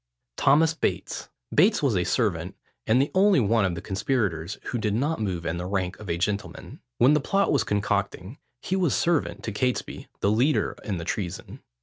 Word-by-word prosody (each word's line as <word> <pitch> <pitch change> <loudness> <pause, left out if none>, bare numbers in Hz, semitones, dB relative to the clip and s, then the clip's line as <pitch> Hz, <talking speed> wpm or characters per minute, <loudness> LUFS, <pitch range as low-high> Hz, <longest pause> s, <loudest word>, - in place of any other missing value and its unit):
THOMAS 155 +4 +4
BATES. - - -3 0.2
Bates - - +4
was - - +2
a - - +2
servant, - - -1 0.3
and 115 +3 +4
the 140 - +1
only 195 -2 +5
one 115 -2 +2
of 90 -2 -1
the 85 - -7
conspirators 95 -4 -1
who 120 - -3
did 105 -2 0
not 145 +4 0
move 90 -5 -2
in 80 +1 -2
the 90 - -4
rank 95 -1 -2
of 105 - -9
a 85 - 0
gentleman. 100 +3 -4 0.2
When 130 +5 +5
the 150 - +4
plot 195 +7 +1
was 140 -6 +2
concocting, 100 +1 -2 0.2
he 190 - -1
was 180 -6 +1
servant 170 -3 0
to 110 - -3
Catesby, 125 +4 -2
the 100 - +2
leader 130 +8 +2
in 100 -5 -3
the 85 - -6
treason. 95 -1 -5
110 Hz, 195 wpm, -25 LUFS, 95-140 Hz, 0.3 s, only